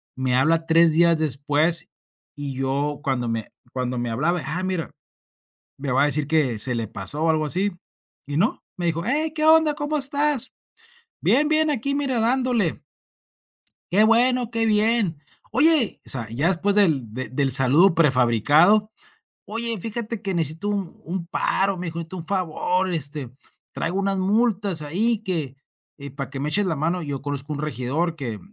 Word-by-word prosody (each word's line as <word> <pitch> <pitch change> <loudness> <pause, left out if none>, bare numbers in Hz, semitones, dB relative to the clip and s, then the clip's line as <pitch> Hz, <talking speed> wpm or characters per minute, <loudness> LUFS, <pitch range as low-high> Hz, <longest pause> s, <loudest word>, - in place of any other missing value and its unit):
Me 130 -1 0
habla 160 +5 +2
3 165 0 +4
días 170 +1 +4
después, 150 +3 +1 0.5
y 145 -1 -5
yo 140 +2 -2
cuando 125 -4 -1
me 115 -2 -4 0.2
cuando 125 -1 -3
me 120 0 -2
hablaba. 155 +9 0
Ah, 175 +6 -3
mira. 185 -3 -3 0.9
Me 140 -1 -4
va 130 - +3
a - - +5
decir 150 0 +1
que 150 -7 +1
se 125 +4 0
le 115 -1 -3
pasó 145 +12 -2
o 165 - +2
algo 155 -1 +1
así, 185 +7 +1 0.6
y 145 0 -3
no, 205 +9 0
me 175 - -3
dijo: 165 0 -1
"¡Hey, 300 +5 0
qué 310 - -1
onda!, 315 -1 +5
¿cómo 295 +1 -2
estás?, 285 -2 0 0.7
bien, 300 +2 +3
bien, 310 0 +2
aquí 280 0 -1
mira, 270 -4 -1
dándole". 240 - 0 1.1
"Qué 200 +4 +5
bueno, 240 +2 +3
qué 230 -1 0
bien". 210 -6 +1 0.3
"Oye", 280 0 +4
o - - -11
sea, 115 -5 -2
ya 135 +8 0
después 195 +2 +1
del 160 - +2
del 130 +3 -1
saludo 140 +8 +5
prefabricado. 150 - +4 0.5
"Oye, 230 0 -3
fíjate 225 +1 -4
que 195 -1 -3
necesito 165 +3 -2
un 200 -4 -3
un 175 +1 -4
paro", 195 +2 0
me 180 0 -5
dijo: 165 0 -6
"Necesito 170 +3 -7
un 170 - -8
favor". 185 0 -1
Este: 145 -5 -2 0.4
"Traigo 180 +4 -2
unas 195 0 0
multas 200 -3 +1
ahí 205 +10 0
que, 160 -9 -3 0.4
eh, 140 -1 -9
para 140 -2 -6
que 135 -1 -6
me 145 +2 -2
eches 205 +6 +1
la 170 -4 -1
mano". 165 +5 -1
Yo 145 -4 -5
conozco 145 +1 -4
un 145 - -5
regidor 150 +3 -2
que 120 -8 -5
165 Hz, 170 wpm, -23 LUFS, 145-210 Hz, 1.1 s, a